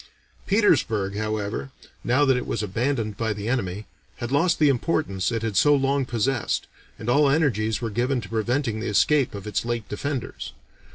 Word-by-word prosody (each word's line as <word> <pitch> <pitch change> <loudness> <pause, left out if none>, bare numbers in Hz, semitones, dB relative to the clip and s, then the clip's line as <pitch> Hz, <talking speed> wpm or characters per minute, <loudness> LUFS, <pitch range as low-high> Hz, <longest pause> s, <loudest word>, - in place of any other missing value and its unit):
Petersburg, 110 - +2
however, 110 +3 -3 0.3
now 130 +4 +3
that 135 -2 +4
it 125 - -3
was - - -2
abandoned 110 +1 -1
by 110 -2 -1
the 105 +1 -6
enemy, 105 -5 -2 0.3
had 120 +1 -5
lost 165 +5 +3
the 150 - +4
importance 125 - 0
it 115 -1 -2
had 110 -3 -2
so 145 +9 +5
long 135 0 +1
possessed, 120 0 -1 0.3
and 110 - -8
all 140 +3 +4
energies 115 -8 +1
were 115 - -2
given 125 +4 0
to 105 - -8
preventing 115 +1 -1
the 110 - -3
escape 135 +4 +2
of 100 - -7
its 105 -2 -1
late 115 -3 -3
defenders. 135 +4 -4
120 Hz, 175 wpm, -24 LUFS, 105-135 Hz, 0.3 s, so